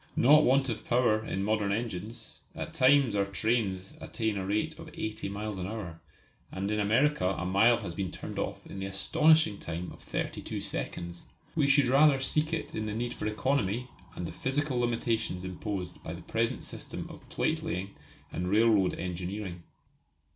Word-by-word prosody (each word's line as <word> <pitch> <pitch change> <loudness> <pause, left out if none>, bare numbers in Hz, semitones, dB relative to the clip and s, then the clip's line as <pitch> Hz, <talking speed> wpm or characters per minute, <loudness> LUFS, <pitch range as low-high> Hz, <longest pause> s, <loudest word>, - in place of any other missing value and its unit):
Not 150 +5 +7
want 135 +1 +4
of 115 -3 -3
power 120 -3 +2
in 95 -3 -2
modern 105 -1 +1
engines; 110 +1 -4 0.2
at 165 - -5
times 135 -4 +5
our 100 - +3
trains 100 -2 0
attain 110 -2 -2
a 95 - -2
rate 105 +2 -1
of - - -9
80 110 -2 -4
miles 105 0 -4
an 90 - -3
hour, 95 -6 -6 0.5
and 100 +2 -2
in 105 - 0
America 115 +2 +3
a 85 - -3
mile 105 +6 +5
has 95 -7 -5
been 95 +1 -2
turned - - -6
off - - -4
in 95 - -8
the 95 - -3
astonishing 105 +6 +4
time 85 +2 -5
of - - -13
thirty - - -3
two - - -4
seconds. 85 0 -5 0.3
We 150 -4 +3
should 140 0 +5
rather 140 +2 +5
seek 150 +4 +2
it 165 - -3
in 110 0 -2
the 105 - -3
need 120 +1 -2
for - - -4
economy 120 +1 0 0.3
and 90 - -4
in - - -7
the - - -17
physical 135 -1 0
limitations 115 -5 0
imposed 95 -1 -5
by 80 - -6
the 85 0 -9
present 115 +4 -1
system - - -6
of - - -13
plate - - 0
laying 95 +2 -3 0.4
and 90 - -3
railroad 105 -1 +4
engineering. 90 +1 -4
110 Hz, 185 wpm, -30 LUFS, 95-125 Hz, 0.5 s, Not